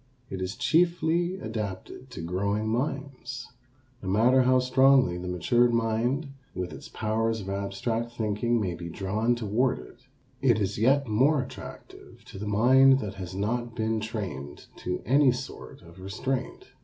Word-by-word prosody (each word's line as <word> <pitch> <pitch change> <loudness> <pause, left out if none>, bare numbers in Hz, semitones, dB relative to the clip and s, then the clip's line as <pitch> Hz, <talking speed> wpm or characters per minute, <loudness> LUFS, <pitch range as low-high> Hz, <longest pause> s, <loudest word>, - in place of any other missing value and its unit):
It 95 -1 -4
is 95 +3 -3
chiefly 170 +3 +2
adapted 110 +3 -6
to 125 - -7
growing 100 +5 -1
minds. 130 +1 -3 0.6
No 95 - -4
matter 120 +7 +4
how 130 0 +4
strongly 130 -6 +4
the 90 - -6
matured 120 +7 +2
mind 115 +6 0 0.3
with 90 -1 -4
its - - -10
powers 110 +1 -1
of 95 - -7
abstract 100 +4 -2
thinking 115 +1 0
may 95 -5 -1
be 85 0 -7
drawn 105 +7 0
toward 120 +3 0
it, - - -13 0.4
it 120 -5 +4
is 100 0 -1
yet 135 +5 +3
more 130 +6 +3
attractive - - -11
to 95 - -10
the 105 - -5
mind 130 +6 +6
that 105 -6 -4
has 95 -1 -7
not 115 +4 -2
been 110 -1 0
trained 100 - -6
to 90 - -4
any 135 +3 +5
sort 125 +2 -8
of 85 +2 -15
restraint. 125 +7 -4
115 Hz, 155 wpm, -27 LUFS, 100-130 Hz, 0.6 s, mind